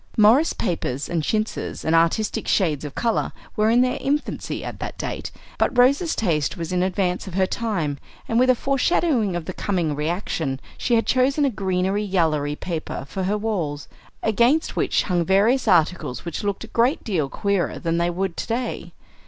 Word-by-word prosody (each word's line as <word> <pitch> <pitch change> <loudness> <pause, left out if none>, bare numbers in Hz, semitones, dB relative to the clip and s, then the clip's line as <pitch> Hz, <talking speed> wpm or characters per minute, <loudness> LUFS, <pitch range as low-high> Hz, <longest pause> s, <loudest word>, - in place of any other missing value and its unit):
Morris 230 +9 +5
papers 145 -6 -2
and 170 -2 -1
chintzes 215 +7 -2
and 160 - +1
"artistic" 170 +6 +2
shades 155 -7 +1
of 145 -1 -7
color 230 -2 0 0.2
were 215 +1 +3
in 240 +2 +5
their 255 0 +1
infancy 290 +2 -2
at - - -6
that - - -5
date; - - -4 0.3
but - - +1
Rose's 280 +7 +4
taste 160 -8 0
was 165 -1 -4
in 180 - +1
advance 185 0 0
of 185 - -7
her 190 -1 +3
time, 180 -11 -2 0.3
and 230 - +2
with 255 +1 +4
a 255 - +6
foreshadowing 270 - +1
of 175 -2 -3
the 185 - -5
coming 175 -7 -1
"reaction," 155 -3 -2 0.2
she 240 - +1
had 225 - +2
chosen 270 +3 +2
a 275 - +1
"greenery, 190 0 0
yallery" 160 -7 +1
paper 160 -5 -4
for 185 +7 -3
her 205 +3 +1
walls, 175 -10 -2 0.4
against 240 +8 +2
which - - +1
hung 175 -3 +1
various 210 +8 +3
articles 175 -7 +2
which 170 +3 -4
looked 200 0 -2
a - - -8
great 245 +6 +2
deal 165 -10 -1
queerer 200 +1 0
then - - -9
than 165 -1 0
they 170 0 +1
would 180 0 -2
to - - -4
day. 240 +2 -3
195 Hz, 185 wpm, -23 LUFS, 170-230 Hz, 0.4 s, a